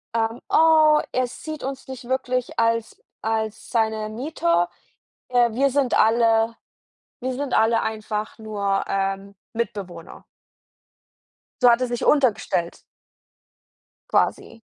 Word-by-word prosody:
ähm, 225 Hz, +1 st, -1 dB
oh, 315 Hz, -1 st, +5 dB
er 255 Hz, 0 st, +1 dB
sieht 310 Hz, +4 st, -8 dB
uns 270 Hz, 0 st, -5 dB
nicht 260 Hz, -2 st, -8 dB
wirklich 255 Hz, -1 st, -2 dB
als 230 Hz, 0 st, 0 dB, 0.2 s
als 220 Hz, -1 st, -3 dB
seine 220 Hz, -2 st, 0 dB
Mieter, 175 Hz, -, 0 dB, 0.6 s
äh, 245 Hz, -1 st, +3 dB
wir 275 Hz, +4 st, +2 dB
sind 270 Hz, -1 st, +1 dB
alle 225 Hz, 0 st, +3 dB, 0.6 s
wir 255 Hz, 0 st, -2 dB
sind 275 Hz, 0 st, -4 dB
alle 225 Hz, +1 st, +3 dB
einfach 215 Hz, 0 st, -4 dB
nur, 200 Hz, -3 st, -1 dB
ähm, 195 Hz, 0 st, -2 dB, 0.2 s
Mitbewohner. 195 Hz, -7 st, -5 dB, 1.4 s
So 245 Hz, -, +8 dB
hat 235 Hz, 0 st, +5 dB
er 255 Hz, -, 0 dB
sich 240 Hz, 0 st, -3 dB
untergestellt. 230 Hz, -, +1 dB, 1.3 s
Quasi. 230 Hz, -, 0 dB
230 Hz, 115 wpm, -23 LUFS, 215-255 Hz, 1.4 s, So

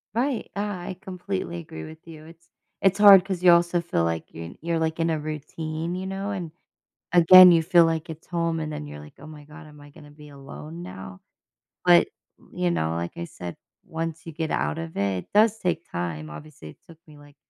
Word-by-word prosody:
Right, 255 Hz, +1 st, -1 dB
I 200 Hz, -, -2 dB, 0.3 s
I 185 Hz, -, -9 dB
completely 100 Hz, -, -5 dB
agree 80 Hz, -1 st, -9 dB
with 160 Hz, +2 st, -13 dB
you, 155 Hz, -2 st, -12 dB
it's 165 Hz, +1 st, -17 dB, 0.3 s
it's 195 Hz, 0 st, +3 dB
hard 195 Hz, -3 st, +9 dB
'cause 190 Hz, -2 st, -4 dB
you 180 Hz, -, +8 dB
also 170 Hz, 0 st, +3 dB
feel 170 Hz, -, -1 dB
like 80 Hz, -1 st, -4 dB
you're 85 Hz, +1 st, -8 dB
you're, 165 Hz, 0 st, -1 dB
like, 160 Hz, 0 st, -2 dB
in 165 Hz, -, +1 dB
a 160 Hz, -1 st, -1 dB
routine, 155 Hz, +2 st, -5 dB
you 185 Hz, +1 st, -5 dB
know, 195 Hz, +1 st, -4 dB
and, 180 Hz, -5 st, -5 dB, 0.6 s
again, 180 Hz, +1 st, +9 dB
you 165 Hz, -1 st, +3 dB
feel 175 Hz, 0 st, +5 dB
like 165 Hz, 0 st, -1 dB
it's 160 Hz, 0 st, -10 dB
home, 170 Hz, -1 st, -1 dB
and 155 Hz, -1 st, -4 dB
then 75 Hz, -, -6 dB
you're 75 Hz, 0 st, -9 dB
like, 75 Hz, 0 st, -14 dB
"Oh 150 Hz, -, -12 dB
my 155 Hz, -1 st, -12 dB
god, 155 Hz, +2 st, -13 dB
am 150 Hz, -1 st, -16 dB
I 145 Hz, 0 st, -15 dB
gonna 145 Hz, +1 st, -16 dB
be 150 Hz, 0 st, -15 dB
alone 145 Hz, +4 st, -10 dB
now?" 95 Hz, -, -10 dB, 0.6 s
But, 175 Hz, -1 st, +5 dB, 0.3 s
n -, -, -23 dB
y 180 Hz, -, -6 dB
you 175 Hz, -, +2 dB
know, 80 Hz, -, -1 dB
like 85 Hz, +1 st, -5 dB
I 85 Hz, -, -4 dB
said, 85 Hz, 0 st, -9 dB, 0.3 s
once 165 Hz, 0 st, -5 dB
you 165 Hz, -, -7 dB
get 160 Hz, 0 st, -4 dB
out 75 Hz, +1 st, -1 dB
of 80 Hz, 0 st, -7 dB
it, 100 Hz, -2 st, -1 dB
it -, -, -33 dB
does 215 Hz, +1 st, +4 dB
take 175 Hz, -3 st, -2 dB
time, 80 Hz, -3 st, -4 dB
obviously, 105 Hz, -, -11 dB
it -, -, -15 dB
took 165 Hz, -1 st, -16 dB
me, 150 Hz, -1 st, -16 dB
like, 145 Hz, -1 st, -18 dB
160 Hz, 225 wpm, -24 LUFS, 135-175 Hz, 0.6 s, hard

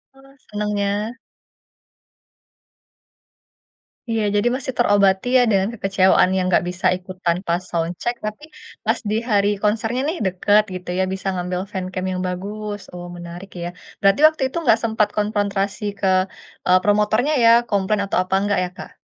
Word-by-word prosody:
Oh, 270 Hz, -, -19 dB, 0.3 s
senengnya. 210 Hz, +1 st, -2 dB, 2.9 s
Iya, 225 Hz, -2 st, 0 dB
jadi 205 Hz, +4 st, +2 dB
masih 260 Hz, 0 st, -4 dB
terobati 200 Hz, -2 st, +3 dB
ya -, -, +6 dB
dengan 195 Hz, -1 st, +2 dB
kekecewaan 195 Hz, -3 st, +3 dB
yang 185 Hz, -1 st, +1 dB
enggak 180 Hz, -, +3 dB
bisa 180 Hz, +1 st, -6 dB
ikut 185 Hz, 0 st, -10 dB
tanpa 170 Hz, +1 st, 0 dB, 0.2 s
sound 170 Hz, +1 st, -1 dB
check, 240 Hz, -, -1 dB
tapi 215 Hz, +8 st, -5 dB, 0.4 s
pas -, -, +1 dB
di 215 Hz, -, 0 dB
hari 205 Hz, -2 st, +3 dB
konsernya 225 Hz, +4 st, 0 dB
nih 335 Hz, +3 st, -2 dB
deket 205 Hz, +3 st, +3 dB
gitu 180 Hz, -1 st, -8 dB
ya, -, -, +3 dB
bisa 190 Hz, 0 st, -5 dB
ngambil 180 Hz, 0 st, -2 dB
fancam 185 Hz, -1 st, -4 dB
yang 185 Hz, 0 st, -3 dB
bagus. 205 Hz, +3 st, -5 dB
Oh, 175 Hz, 0 st, -7 dB
menarik 175 Hz, +3 st, -9 dB
ya. 175 Hz, -, -3 dB, 0.3 s
Berarti 195 Hz, +8 st, +3 dB
waktu 315 Hz, -2 st, -3 dB
itu 305 Hz, -, -6 dB
enggak -, -, +4 dB
sempat 220 Hz, -2 st, +2 dB
konfrontasi 205 Hz, -1 st, -1 dB, 0.2 s
ke, 195 Hz, -, 0 dB, 0.6 s
eee, 185 Hz, 0 st, +6 dB
promotornya 215 Hz, +7 st, +2 dB
ya, 230 Hz, -, +7 dB, 0.2 s
komplain 200 Hz, 0 st, +1 dB
atau 195 Hz, -, -1 dB
apa 190 Hz, +1 st, -1 dB
enggak 205 Hz, -1 st, +1 dB
ya, 180 Hz, -, -6 dB
Kak? -, -, -8 dB
200 Hz, 155 wpm, -21 LUFS, 185-215 Hz, 2.9 s, ya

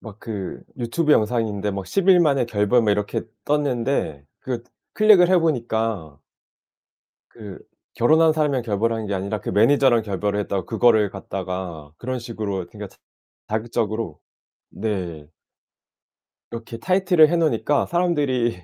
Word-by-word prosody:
막 110 Hz, -3 st, -11 dB
그 105 Hz, -5 st, -6 dB, 0.2 s
유튜브 150 Hz, +7 st, +1 dB
영상인데 105 Hz, -3 st, 0 dB
뭐 100 Hz, -1 st, -5 dB
'10 195 Hz, -, -1 dB
일 185 Hz, -2 st, +7 dB
만에 140 Hz, -7 st, +2 dB
결별' 105 Hz, +2 st, +2 dB
뭐 105 Hz, -, +2 dB
이렇게 105 Hz, 0 st, -1 dB, 0.2 s
떴는데 135 Hz, -, -1 dB, 0.2 s
그거 125 Hz, -3 st, -4 dB, 0.3 s
클릭을 210 Hz, -5 st, +6 dB
해 185 Hz, -, +5 dB
보니까 115 Hz, -, -2 dB, 1.1 s
그 105 Hz, -5 st, -10 dB, 0.4 s
결혼한 160 Hz, +6 st, +4 dB
사람이랑 150 Hz, -5 st, 0 dB
결별한 110 Hz, 0 st, -1 dB
게 100 Hz, -, -2 dB
아니라 100 Hz, +3 st, -3 dB
그 -, -, -4 dB
매니저랑 120 Hz, +1 st, +4 dB
결별을 105 Hz, 0 st, -2 dB
했다고 100 Hz, -3 st, -3 dB
그거를 110 Hz, -3 st, +3 dB
갖다가 90 Hz, -6 st, -6 dB
그런 130 Hz, +5 st, -4 dB
식으로 105 Hz, -6 st, -4 dB
그러니까 -, -, -8 dB, 0.6 s
자극적으로 110 Hz, -4 st, -3 dB, 0.5 s
네. 90 Hz, -8 st, -4 dB, 1.2 s
이렇게 115 Hz, 0 st, -7 dB
타이틀을 180 Hz, +1 st, +4 dB
해 175 Hz, -, +2 dB
놓으니까 155 Hz, -3 st, +1 dB
사람들이 140 Hz, -, 0 dB
115 Hz, 305 characters per minute, -22 LUFS, 100-140 Hz, 1.2 s, 일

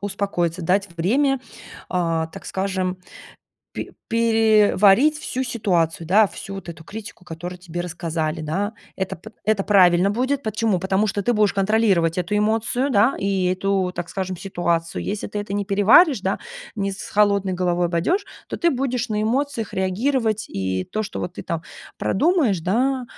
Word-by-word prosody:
успокоиться. 185 Hz, -4 st, -2 dB
Дать 195 Hz, +4 st, +1 dB
время, 270 Hz, -, +2 dB, 0.5 s
а, 165 Hz, -3 st, 0 dB
так -, -, -11 dB
скажем, 190 Hz, -1 st, -2 dB, 0.7 s
пе -, -, -6 dB, 0.2 s
переварить 225 Hz, +3 st, +4 dB
всю 265 Hz, -4 st, -3 dB
ситуацию, 180 Hz, -9 st, 0 dB
да, 205 Hz, +6 st, +5 dB
всю 195 Hz, 0 st, -8 dB
вот 195 Hz, -, -9 dB
эту 165 Hz, -1 st, -8 dB
критику, 205 Hz, 0 st, -9 dB
которую 175 Hz, +2 st, -7 dB
тебе 175 Hz, -1 st, -6 dB
рассказали, 165 Hz, -2 st, -3 dB
да. 190 Hz, +8 st, -2 dB, 0.2 s
Это 190 Hz, -1 st, -3 dB
п 200 Hz, +7 st, -12 dB
это 215 Hz, -2 st, +2 dB
правильно 185 Hz, -2 st, +5 dB
будет. 260 Hz, +5 st, 0 dB
Почему? 215 Hz, -4 st, 0 dB
Потому 190 Hz, +3 st, +1 dB
что 200 Hz, -1 st, -2 dB
ты 240 Hz, -, +2 dB
будешь 210 Hz, -1 st, +2 dB
контролировать 195 Hz, -5 st, +2 dB
эту 180 Hz, +4 st, -1 dB
эмоцию, 225 Hz, +5 st, +1 dB
да, 225 Hz, +2 st, +4 dB
и 195 Hz, -1 st, 0 dB
эту, 190 Hz, -1 st, 0 dB
так 175 Hz, 0 st, -5 dB
скажем, 190 Hz, -1 st, -4 dB
ситуацию. 170 Hz, -3 st, -2 dB
Если 205 Hz, +1 st, -3 dB
ты 210 Hz, -, -4 dB
это 205 Hz, -1 st, -5 dB
не 205 Hz, 0 st, -1 dB
переваришь, 210 Hz, -, +5 dB
да, 190 Hz, +1 st, -1 dB, 0.3 s
не 200 Hz, -2 st, -1 dB
с 195 Hz, -, -7 dB
холодной 200 Hz, -2 st, +2 dB
головой 175 Hz, -1 st, +1 dB
пойдёшь, 190 Hz, -, 0 dB, 0.2 s
то -, -, -4 dB
ты 340 Hz, -, +2 dB
будешь 250 Hz, -2 st, -1 dB
на 210 Hz, 0 st, 0 dB
эмоциях 240 Hz, -1 st, -1 dB
реагировать 215 Hz, +3 st, 0 dB
и 95 Hz, -1 st, -2 dB
то, 215 Hz, 0 st, -2 dB
что 210 Hz, -, -6 dB
вот 180 Hz, -, -5 dB
ты -, -, -7 dB
там 165 Hz, -1 st, -3 dB, 0.3 s
продумаешь, 275 Hz, -, +2 dB
да, 250 Hz, +9 st, 0 dB
200 Hz, 165 wpm, -22 LUFS, 180-220 Hz, 0.7 s, да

